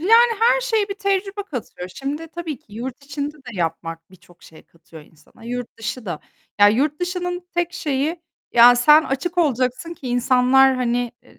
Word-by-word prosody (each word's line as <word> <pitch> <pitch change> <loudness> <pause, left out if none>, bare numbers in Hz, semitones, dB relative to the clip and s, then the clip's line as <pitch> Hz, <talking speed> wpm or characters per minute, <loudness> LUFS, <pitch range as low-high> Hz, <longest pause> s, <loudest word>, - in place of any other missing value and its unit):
yani, 460 +6 +5
her - - +4
şeye 445 -5 0
bir 395 - -4
tecrübe 395 0 -1
katıyor. 250 - -7
Şimdi, 290 +4 -5
tabii 325 -4 -6
ki - - -37
yurt 250 +5 -7
içinde 285 +1 -5
de - - -20
yapmak 165 -2 -4
birçok 175 -2 -21
şey 160 - -16
katıyor 160 -1 -16
insana. 155 +8 -20
Yurt 245 0 -5
dışı 230 +1 -5
da, 170 -4 -4 0.4
ya, 205 - +9
yurt 285 +8 0
dışının 355 0 -3
tek 350 0 -1
şeyi, 300 +3 -2 0.3
ya 240 +1 +8
sen 300 +6 +6
açık 320 +7 -3
olacaksın 265 +1 0
ki 265 - -8
insanlar, 255 +2 +4
hani, 245 -1 -1
i - - -22
270 Hz, 175 wpm, -21 LUFS, 235-350 Hz, 0.4 s, ya